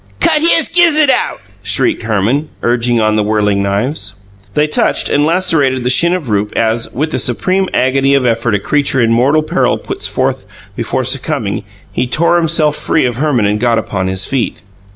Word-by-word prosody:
"Cut 300 - +3
his 330 -1 +4
gizzud 310 -5 +4
out!" - - -1 0.2
shrieked 340 -3 -1
Herman, 115 +8 -1
urging 120 0 +1
on 110 -1 +1
the 110 - +1
whirling 105 -1 0
knives. 100 +1 -2 0.4
They 150 0 +2
touched 150 - 0
and 145 +1 +1
lacerated 150 -7 +1
the 125 - +1
shin 170 +7 +4
of 170 -7 -5
Rupe, 105 -1 -1
as, 115 0 -1
with 150 +5 -3
the - - -1
supreme 185 +10 0
agony 135 +2 +1
of 135 -2 +1
effort 115 -2 0
a - - 0
creature 140 +4 0
in 115 -2 +2
mortal 135 +7 +2
peril - - 0
puts - - -3
forth - - -2 0.3
before - - -2
succumbing, - - -2 0.3
he 125 - -1
tore 170 +7 +2
himself 160 -3 +2
free 155 - 0
of 120 -2 -2
Herman 135 -6 0
and 105 +1 0
got 120 0 +1
upon 95 -4 -3
his 95 0 -1
feet. 130 -8 -3
130 Hz, 185 wpm, -13 LUFS, 110-155 Hz, 0.4 s, his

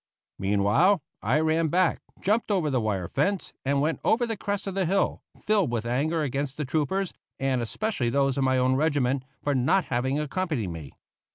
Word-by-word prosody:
Meanwhile, 100 - +3 0.2
I 125 +8 +2
ran 160 +1 +2
back, 175 +2 +2 0.2
jumped 215 +4 +1
over 180 -8 +1
the 130 -3 +1
wire 100 -5 -1
fence, 180 - -1
and 140 +1 +1
went 155 +2 0
over 240 +2 +3
the 225 -1 -2
crest 200 0 -3
of 195 - -3
the 190 -2 0
hill, 195 +3 +1 0.2
filled 205 - +2
with 115 -2 -2
anger 150 +7 0
against 140 0 -2
the 150 - -2
troopers, 160 +7 -1 0.3
and 135 -2 +1
especially 125 - -1
those 135 +1 +2
of 140 - 0
my 130 0 +2
own 130 0 +3
regiment, 135 -3 +1 0.2
for 145 - +1
not 140 +8 +2
having 130 +4 0
accompanied 150 - -2
me. 80 -5 -8
145 Hz, 185 wpm, -26 LUFS, 130-185 Hz, 0.3 s, Meanwhile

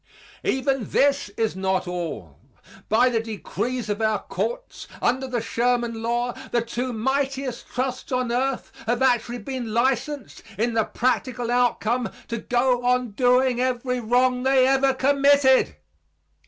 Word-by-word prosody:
Even 265 -3 0
this 280 -5 +2
is 220 -3 0
not 190 -1 -1
all. 155 - -5 0.5
By 240 +4 +4
the 235 -2 +1
decrees 230 +2 -4
of 205 +1 -2
our 215 -1 +2
courts, - - -4
under 260 +2 0
the 245 -2 -2
Sherman 235 0 0
law, 240 +1 -1 0.2
the 235 -1 +1
two 245 +2 -3
mightiest 265 +2 -2
trusts 255 +1 -3
on 250 -2 0
earth 260 +2 -1 0.2
have 240 +2 +1
actually 245 -2 +2
been 240 -1 -5
licensed, 265 +1 -1 0.2
in 230 +3 0
the 225 -2 +2
practical 245 -1 -1
outcome, 245 -1 +1 0.2
to 235 - -2
go 245 +1 +1
on 250 -1 +1
doing 250 +2 +3
every 250 0 -1
wrong 250 +2 +2
they 265 0 +4
ever 270 0 +3
committed. 280 - +4
245 Hz, 140 wpm, -24 LUFS, 230-260 Hz, 0.5 s, By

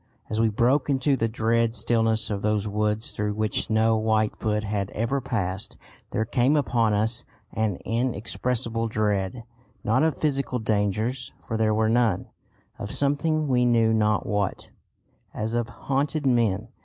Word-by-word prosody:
As 110 +1 +1
we 115 - +3
broke 120 +8 +2
into 140 0 +2
the 115 -3 0
dread 115 +1 +1
stillness 110 -2 +1
of 100 -1 -2
those 105 0 0
woods 105 +1 0
through 105 0 -2
which 110 0 -1
no 110 0 +3
white 110 -1 +1
foot 105 0 -1
had 100 -2 -2
ever 120 +5 0
passed, 100 -6 -3 0.3
there 110 - -1
came 125 +5 +2
upon 120 -6 +2
us 110 +4 +1 0.3
an 110 -3 0
inexpressible 115 0 -1
dread, 105 0 -1 0.4
not 120 +3 +2
of 160 0 +1
physical 140 -4 0
dangers, 110 +3 -1
for 110 - -5
there 110 -1 +2
were 110 0 +2
none; 115 -4 +1 0.5
of 100 - -5
something, 150 +2 +1
we 125 -2 +2
knew 115 -2 +3
not 105 -1 +2
what, 105 -2 -2 0.6
as 110 +2 -3
of 120 -1 -1
haunted 145 +2 -2
men. 115 -4 +1
110 Hz, 155 wpm, -25 LUFS, 105-125 Hz, 0.6 s, we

